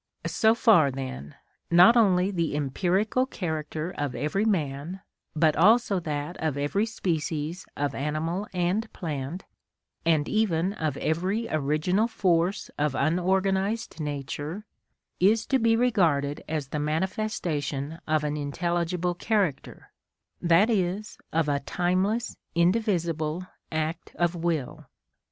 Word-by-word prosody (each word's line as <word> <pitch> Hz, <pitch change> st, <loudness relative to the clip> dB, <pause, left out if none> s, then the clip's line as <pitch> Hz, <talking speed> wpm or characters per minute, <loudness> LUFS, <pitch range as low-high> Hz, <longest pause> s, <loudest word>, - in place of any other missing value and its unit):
So 220 Hz, -2 st, +3 dB
far 210 Hz, -, +5 dB
then, 130 Hz, -, -6 dB, 0.3 s
not 180 Hz, +7 st, +7 dB
only 195 Hz, -4 st, +4 dB
the 170 Hz, -6 st, -1 dB
empirical 185 Hz, -, +1 dB
character 160 Hz, -, -4 dB
of 145 Hz, -3 st, -3 dB
every 195 Hz, +8 st, 0 dB
man, 165 Hz, -2 st, -1 dB, 0.3 s
but 155 Hz, -1 st, +3 dB
also 210 Hz, +2 st, +4 dB
that 150 Hz, 0 st, -4 dB
of 155 Hz, -3 st, -2 dB
every 170 Hz, +10 st, 0 dB
species 165 Hz, -4 st, -3 dB
of 145 Hz, 0 st, -1 dB
animal 160 Hz, +7 st, -2 dB
and 185 Hz, +5 st, -1 dB
plant, 155 Hz, 0 st, -5 dB, 0.6 s
and 160 Hz, -3 st, +2 dB
even 195 Hz, -4 st, +1 dB
of 155 Hz, -8 st, -2 dB
every 190 Hz, +8 st, -1 dB
original 155 Hz, +8 st, +1 dB
force 185 Hz, -4 st, 0 dB
of 150 Hz, -2 st, +1 dB
unorganised 190 Hz, +7 st, 0 dB
nature, 150 Hz, +6 st, -4 dB, 0.5 s
is 215 Hz, +5 st, +3 dB
to 265 Hz, -, +2 dB
be 225 Hz, -1 st, +3 dB
regarded 165 Hz, -12 st, +1 dB
as 150 Hz, -4 st, -2 dB
the 150 Hz, -, -3 dB
manifestation 160 Hz, -, -2 dB
of 155 Hz, -1 st, +1 dB
an 150 Hz, 0 st, -1 dB
intelligible 170 Hz, +4 st, -1 dB
character, 190 Hz, -, -2 dB, 0.5 s
that 175 Hz, +7 st, +4 dB
is, 200 Hz, +1 st, -1 dB
of 160 Hz, -1 st, +1 dB
a 140 Hz, -1 st, +1 dB
timeless, 185 Hz, -, -1 dB, 0.2 s
indivisible 170 Hz, -3 st, +1 dB, 0.3 s
act 160 Hz, +1 st, -3 dB
of 175 Hz, 0 st, +2 dB
will. 165 Hz, -6 st, -3 dB
170 Hz, 120 wpm, -27 LUFS, 150-195 Hz, 0.6 s, not